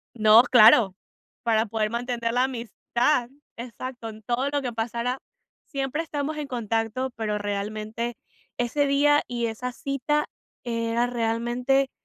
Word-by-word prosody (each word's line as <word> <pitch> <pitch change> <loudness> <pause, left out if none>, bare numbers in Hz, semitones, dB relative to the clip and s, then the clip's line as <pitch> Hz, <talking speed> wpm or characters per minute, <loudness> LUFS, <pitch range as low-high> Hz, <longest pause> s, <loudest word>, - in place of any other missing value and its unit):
No, 220 +1 +7
claro. 225 -5 +7 0.5
Para 225 -1 +2
poder 215 0 -1
mantener 235 -1 -2
la 250 +1 +3
amistad. 240 +1 0 0.3
Exacto, 240 0 -7
en 220 0 -10
todo 245 +5 0
lo 285 -1 -1
que 245 -2 -3
pasara, 235 +3 -2 0.5
siempre 275 +1 -2
estamos 300 -1 -3
en 295 - -3
contacto, 230 +1 -2
pero 210 -2 -1
realmente 215 +3 -3 0.4
ese 280 +4 +1
día 290 +1 +4
y 240 -1 -1
esa 240 +3 -4
cita 290 +2 -1 0.4
era 230 0 0
realmente 245 +3 0
240 Hz, 130 wpm, -25 LUFS, 225-265 Hz, 0.5 s, No